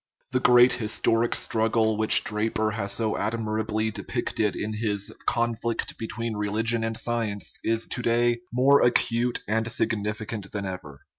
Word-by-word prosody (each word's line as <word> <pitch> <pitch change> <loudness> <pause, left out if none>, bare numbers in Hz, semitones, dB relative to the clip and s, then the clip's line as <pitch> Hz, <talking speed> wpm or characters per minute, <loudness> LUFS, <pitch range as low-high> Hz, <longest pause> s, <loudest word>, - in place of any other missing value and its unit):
The 125 - +2
great 125 0 +6
historic 115 +1 0
struggle 110 0 +1
which 110 0 +5
Dra 105 +1 0
per 110 -1 0
has 100 -2 -3
so 110 +1 -1
admirably 110 -1 -1
depicted 105 0 -2
in 110 +1 -3
his 105 -2 -2
Conflict 115 0 -1
between 115 0 -4
Religion 110 +3 0
and 115 0 -2
Science 115 -4 -3
is 115 0 0
to 125 - -4
day 120 0 +2
more 135 +4 +5
acute 120 0 +1
and 110 +2 0
signifi 110 -1 -2
cant 105 -4 -6
than 100 -1 -4
ever. 85 -7 -7
110 Hz, 150 wpm, -26 LUFS, 105-115 Hz, -, great